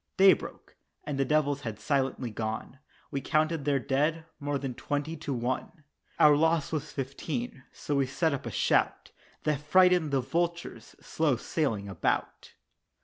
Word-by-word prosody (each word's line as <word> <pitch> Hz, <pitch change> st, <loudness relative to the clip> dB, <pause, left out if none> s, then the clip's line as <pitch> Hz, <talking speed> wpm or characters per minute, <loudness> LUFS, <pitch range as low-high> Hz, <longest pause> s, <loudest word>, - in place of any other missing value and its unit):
Day 195 Hz, 0 st, +8 dB
broke, -, -, -8 dB, 0.3 s
and 140 Hz, -2 st, -4 dB
the 135 Hz, -, +3 dB
devils 145 Hz, -1 st, +1 dB
had 110 Hz, -5 st, -5 dB
silently 135 Hz, -1 st, -1 dB
gone, 110 Hz, +4 st, -4 dB, 0.3 s
We 140 Hz, -, -2 dB
counted 155 Hz, -1 st, +1 dB
their 145 Hz, -1 st, +3 dB
dead, 150 Hz, +5 st, 0 dB
more 145 Hz, 0 st, -1 dB
than 135 Hz, -2 st, -4 dB
twenty 145 Hz, +5 st, -3 dB
to 145 Hz, -, -5 dB
one! 130 Hz, +6 st, -3 dB, 0.3 s
Our 150 Hz, -1 st, +7 dB
loss 160 Hz, 0 st, +2 dB
was 150 Hz, -2 st, -3 dB
Fifteen 140 Hz, -, -4 dB
so 145 Hz, -, -3 dB
we 135 Hz, -1 st, +2 dB
set 160 Hz, +3 st, 0 dB
up 140 Hz, -, -4 dB
a -, -, -4 dB
shout -, -, +1 dB, 0.3 s
That 150 Hz, -2 st, 0 dB
frightened 180 Hz, +1 st, +4 dB
the 140 Hz, -1 st, +2 dB
vultures 170 Hz, +6 st, -3 dB
slow 155 Hz, -5 st, +1 dB
sailing 115 Hz, -6 st, -2 dB
about. 95 Hz, -, -2 dB
145 Hz, 155 wpm, -29 LUFS, 135-160 Hz, 0.3 s, Day